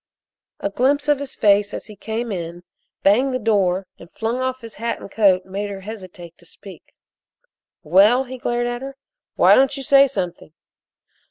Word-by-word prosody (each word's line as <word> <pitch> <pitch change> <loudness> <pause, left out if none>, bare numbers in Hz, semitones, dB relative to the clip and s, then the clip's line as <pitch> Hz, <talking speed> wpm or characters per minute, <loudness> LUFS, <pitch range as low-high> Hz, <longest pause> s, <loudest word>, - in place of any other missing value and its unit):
A 200 - -3
glimpse 280 +7 +1
of 295 -2 +3
his 280 -1 -7
face 205 0 +2
as - - -7
he 210 - -12
came 225 +3 -4
in, 175 -2 -6 0.4
banged 255 +7 +3
the - - +2
door, 195 -5 +1
and 170 - -13
flung 230 +3 -3
off 260 0 -2
his 230 -2 -9
hat 235 0 -2
and - - -11
coat 190 -4 +3
made 200 +2 -4
her 195 -1 -7
hesitate 185 -5 -10
to 175 - -19
speak. 195 -3 -14 0.9
"Well?" 205 +10 +5
he 260 0 -9
glared 240 0 -1
at 240 0 -3
her. 270 0 -8 0.4
"Why - - +6
don't 270 +1 +3
you 275 - -6
say 275 +1 +6
something?" 180 - -5
220 Hz, 180 wpm, -21 LUFS, 190-255 Hz, 0.9 s, Why